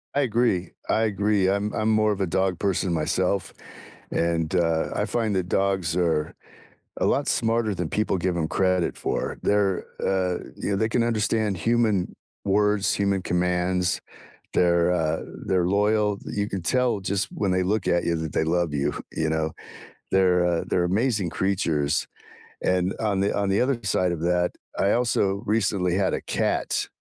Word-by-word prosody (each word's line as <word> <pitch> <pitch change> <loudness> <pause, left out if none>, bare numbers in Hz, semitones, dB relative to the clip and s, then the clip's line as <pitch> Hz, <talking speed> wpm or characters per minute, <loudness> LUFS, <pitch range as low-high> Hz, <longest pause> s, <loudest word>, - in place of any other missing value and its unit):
I 145 - +3
agree, 115 -8 +1 0.2
I - - +2
agree. 100 -2 +1
I'm 100 +2 0
I'm 110 +1 0
more 110 0 +3
of 100 -1 -2
a - - +2
dog 95 0 0
person 95 -2 0
myself, 90 +4 0 0.6
and, 85 0 0
uh, 80 -2 +1
I - - 0
find 110 -4 -1
that 90 -1 -1
dogs 95 -4 0
are 80 -4 0 0.6
a - - 0
lot - - +1
smarter 115 -1 +1
than 90 -3 -3
people 105 -1 0
give 90 0 -1
'em 80 -2 0
credit 90 0 +1
for. - - -2
They're, 100 -2 +1 0.2
uh, 90 -2 +1 0.2
you - - -3
know, - - +2
they 110 +3 0
can 115 +1 +1
understand 110 -3 0
human 110 -1 +1 0.3
words, 105 0 +2
human 100 -1 0
commands. 90 0 0 0.5
They're, 85 0 +3
uh, 80 -2 0 0.2
they're 90 -2 +2
loyal. 105 +1 +2
Th - - -8
You 100 0 0
can 95 -3 -4
tell, 125 +3 +1
just 100 +1 -1
when 100 - -1
they 90 0 +2
look 100 +2 0
at 85 0 +2
you, 85 - 0
that 80 -1 -4
they - - +1
love 85 -1 0
you, 70 -1 0 0.2
you 80 0 -1
know? 80 0 0 0.6
They're, 90 -2 +3
uh, 85 -1 0
they're 90 - +1
amazing 105 +1 +1
creatures, 85 -6 0 0.6
and 90 +1 +1
on 105 -3 0
the 100 - 0
on 100 -1 0
the 95 +1 +2
other 125 -1 +1
side 90 -2 +1
of 80 - -4
that, 90 +1 +1 0.3
I 100 - +3
also 100 -5 +1
recently 100 -4 +1
had 95 -1 +1
a - - -2
cat, - - -1
95 Hz, 175 wpm, -25 LUFS, 90-105 Hz, 0.6 s, I